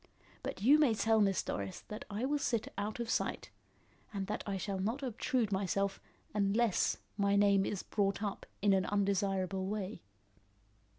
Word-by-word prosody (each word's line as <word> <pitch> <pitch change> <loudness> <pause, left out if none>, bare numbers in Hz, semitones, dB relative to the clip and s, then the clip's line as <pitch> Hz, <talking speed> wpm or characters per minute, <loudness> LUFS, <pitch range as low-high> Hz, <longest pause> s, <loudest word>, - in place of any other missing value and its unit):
But 195 - -5
you 285 +6 +7
may 265 -7 +4
tell 220 0 +3
Miss 195 -2 +2
Doris 100 -2 -4
that 210 - -8
I 210 +4 -2
will 290 +2 +1
sit 235 -5 -1
out 210 +3 -3
of 235 - -2
sight, - - -1 0.6
and 200 -2 -3
that 210 - -3
I 200 -1 -1
shall 195 0 -3
not 225 +9 -1
obtrude 240 -2 0
myself 195 0 0 0.3
unless 210 +1 +2 0.2
my 200 -1 +3
name 200 -1 +4
is 200 - -3
brought 200 0 0
up 205 -2 -4 0.2
in 205 -1 +5
an 190 -1 +2
undesirable 195 -2 0
way." 200 -2 -3
200 Hz, 165 wpm, -34 LUFS, 195-220 Hz, 0.6 s, you